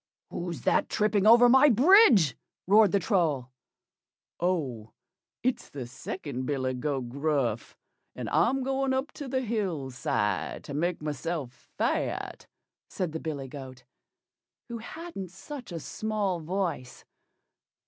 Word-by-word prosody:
"WHO'S 175 -1 -4
THAT - - +2
tripping 210 -1 +2
over 235 +2 +8
my 265 +4 +7
bridge?" 245 - +6 0.3
roared 205 0 +6
the 200 - +3
Troll. 160 - 0 0.9
"Oh! 140 -12 -2 0.5
It's 255 +1 -1
the 135 -3 -6
second 130 +1 -6
billy 130 -3 -1
goat 130 -1 -3
Gruff, 140 -5 -1 0.4
and - - -5
I'm 265 +2 +2
going 270 0 0
up 265 +3 -2
to 285 - -8
the 260 0 -1
hill 195 - -2
side 105 -7 -1
to - - -8
make 165 +2 -1
myself 150 -2 -5
fat," - - -2 0.4
said 180 -4 -3
the 160 - -4
billy 145 -5 -4
goat, 130 -2 -10 0.9
who 235 -1 -5
hadn't 275 - -7
such 245 - -9
a 170 - -4
small 205 0 -2
voice. 165 -6 -3
175 Hz, 130 wpm, -28 LUFS, 135-225 Hz, 0.9 s, over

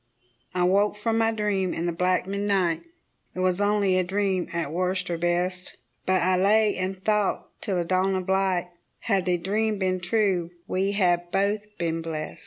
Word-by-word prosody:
I 180 - +2
woke 200 +3 +3
from 225 +2 0
my 225 0 +3
dream 205 -4 -1
in 165 - -2
the 175 - 0
black 180 +2 +1
midnight 195 - 0 0.5
It - - -5
was 185 +1 +1
only 205 -2 +2
a - - +2
dream 190 -1 -1
at 165 -4 -2
worst 185 +1 -1
or 170 - -1
best 180 +2 -1 0.3
But 185 -2 +3
I 185 +1 +3
lay 210 +2 +3
and 185 +1 -3
thought 210 -2 +1
till 195 - -2
the 175 - +1
dawn 185 +2 +1
of 185 -1 -3
light, 190 -2 +1 0.3
Had 195 -4 +1
the 180 -1 +2
dream 210 +5 0
been 185 -1 0
true 180 -2 +1 0.2
we 195 +2 0
had 175 -3 +1
both 205 +2 -1
been 165 -1 -1
blest. 160 -2 -5
185 Hz, 185 wpm, -25 LUFS, 180-205 Hz, 0.5 s, woke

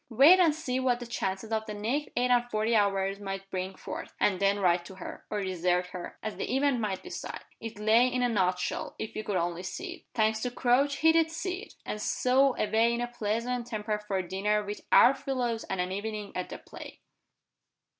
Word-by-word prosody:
Wait 280 +11 +7
and 330 -4 +4
see 260 -5 -2
what 250 -2 +1
the 245 - -6
chances 215 -2 -3
of 220 -1 0
the 210 - -5
next 245 +9 -1
eight 250 +1 +2
and 245 0 +3
forty 220 +1 +1
hours 195 -1 +1
might 195 -1 -5
bring 185 0 -3
forth, - - -7
and 190 -3 +2
then 200 +1 +2
write 175 -2 +3
to 190 - -11
her, 185 - -9
or 210 -1 -2
desert 180 -1 +1
her, 180 -1 -7
as 215 - -4
the 255 - -2
event 275 -2 +2
might 205 -4 -2
decide. - - -6 0.2
It 225 -2 -7
lay 220 +4 +4
in 250 0 0
a - - +4
nut 185 -5 +2
shell, - - -3
if 220 - -6
you 215 - -3
could 205 -2 -2
only 175 0 -1
see 190 +1 -5
it. - - -14
Thanks 220 -1 +2
to 250 - -1
Crouch, 255 +3 +2
he 320 - +9
did 325 0 +3
see 365 +3 -3
it - - -12
and 210 - -4
so 260 +3 +3
away 225 +2 +2
in - - -3
a - - +1
pleasant 235 +2 -2
temper 215 -2 -2
for 210 -2 -3
a 185 -2 -3
dinner 210 +3 0
with 205 +1 -5
"our 255 - +8
fellows" 245 -5 -2
and 190 - -3
an 180 +1 -1
evening 210 +1 -4
at 185 - -3
the - - -6
play! - - -11
215 Hz, 225 wpm, -29 LUFS, 195-245 Hz, 0.2 s, he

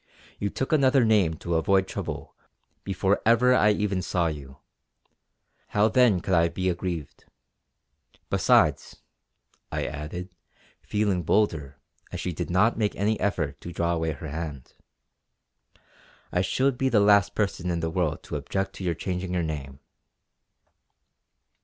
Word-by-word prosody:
You 100 - -1
took 130 +9 -3
another 135 -4 +4
name 100 -7 +3
to 85 +2 -4
avoid 95 +3 +2
trouble - - -6 0.5
before 95 +1 0
ever 120 +3 +4
I 105 -4 +4
even 105 -2 0
saw 90 -1 0
you; 70 -3 -8 1.1
how 105 +1 +2
then 115 -6 +4
could 95 - -2
I 85 -1 +4
be 95 +2 -1
aggrieved. 85 -4 -4 1.1
Besides" - - +3 0.8
I - - -2
added, 75 +5 -6 0.5
feeling 105 -4 0
bolder 80 -7 0 0.3
as - - -5
she 90 - -3
did 85 -1 -4
not 105 +7 +2
make 105 -2 0
any 105 +2 0
effort 80 -8 -2
to 85 - -7
draw 85 0 -1
away 80 -1 -1
her 75 +2 -8
hand, 75 -4 -6 1.6
"I 90 - +1
should 130 +7 0
be 135 - +2
the 115 - +4
last 100 -1 +4
person 95 -4 -1
in 85 -1 -1
the 80 0 -2
world - - -1
to - - -4
object 95 0 -3
to - - -7
your 85 -2 0
changing 90 +1 -4
your 90 - 0
name!" 70 -3 -5
90 Hz, 145 wpm, -26 LUFS, 80-105 Hz, 1.6 s, another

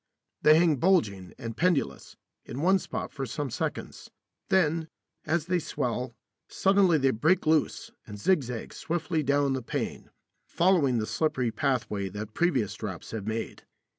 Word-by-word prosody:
They 155 +1 +7
hang 165 -3 +4
bulging 110 - +1
and 115 -1 -6
pendulous, 165 -4 0 0.3
in 125 - -7
one 190 +3 +4
spot - - -5
for 135 -1 -4
some 145 +2 -4
seconds. - - -4 0.4
Then, 165 -3 +2 0.4
as 160 0 +1
they 180 0 +1
swell, 125 -5 -3 0.3
suddenly 195 -4 +3
they 135 -2 +3
break 160 - +2
loose 155 -1 +1 0.2
and 105 - -8
zigzag 125 - 0
swiftly 160 -1 -2
down 140 -1 +2
the 130 - -2
pane, - - -4 0.4
following 165 -8 +3
the 110 - 0
slippery 130 -4 0
pathway 110 -7 -1
that 105 +2 -7
previous 135 - +1
drops - - -7
have 110 -2 -5
made. 110 0 -4
140 Hz, 145 wpm, -28 LUFS, 115-170 Hz, 0.4 s, They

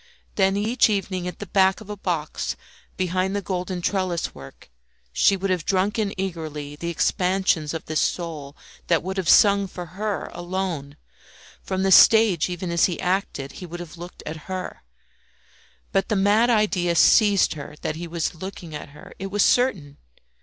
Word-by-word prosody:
Then 195 0 +2
each 225 +4 +2
evening, 190 -3 -2
at 180 - -6
the 205 - -7
back 190 0 +3
of 215 - -12
a 210 - -5
box, 170 -6 -3 0.4
behind 185 +1 0
the 205 - -1
golden 180 -1 -3
trellis 185 -3 -1
work 70 -1 -13 0.4
she 195 - +4
would 190 0 -2
have 180 -4 0
drunk 200 +4 0
in 205 -2 0
eagerly 155 -6 -4
the 170 +3 -5
expansions 180 -2 +1
of 160 - -5
this 155 0 -1
soul 155 -5 -3 0.3
that 170 -2 +2
would 190 +2 -4
have 185 -3 -1
sung 200 -2 +5
for 180 -1 -7
her 210 -1 -2
alone; 175 -5 -4 0.6
from 190 0 -2
the 195 - +2
stage, 205 -5 +6
even 180 0 -4
as 170 -1 +4
he 175 - -2
acted, 180 -7 -2
he 180 - -9
would 175 +1 -7
have 175 -1 -9
looked 175 +1 -10
at 155 +2 -8
her. 185 -1 -5 1.1
But 195 - 0
the 215 - +1
mad 205 +4 +3
idea 200 -6 +2
seized 205 +3 +5
her 150 -1 -9
that 155 - -2
he 170 +2 -6
was 170 0 -2
looking 175 -1 -8
at 150 0 -7
her; - - -13
it 195 - -4
was 200 +1 +1
certain. 185 - +1
185 Hz, 175 wpm, -23 LUFS, 170-195 Hz, 1.1 s, stage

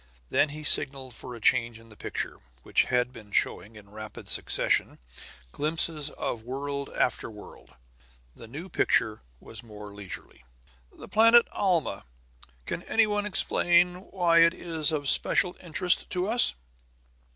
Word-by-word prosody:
Then 150 - +2
he 150 +2 -8
signaled 135 -3 +3
for 125 +2 -9
a - - -10
change 115 +1 +1
in 115 0 -18
the 110 - -16
picture, - - -6 0.2
which - - +1
had 125 0 -1
been 105 -4 -13
showing, 105 +2 -2
in 100 -1 -15
rapid 110 0 -10
succession, - - +1 0.5
glimpses 155 0 -1
of 120 - -5
world 140 +3 -5
after 125 - -1
world. 105 - -14 0.6
The 115 - -13
new 150 +10 -9
picture 110 - 0 0.2
was 110 - -11
more 105 -3 -12
leisurely. 100 -9 -10 0.5
"The - - -13
planet 230 +2 +5
Alma. 180 -5 -1 0.6
Can - - -4
any 225 0 +3
one 205 -1 -2
explain 180 -2 +3
why 170 -3 +2
it 165 +1 +5
is 160 -3 -2
of 145 -3 -3
special 180 +6 +2
interest 175 +1 -1
to 180 +1 -2
us?" 235 +3 +7
145 Hz, 145 wpm, -27 LUFS, 115-175 Hz, 0.6 s, us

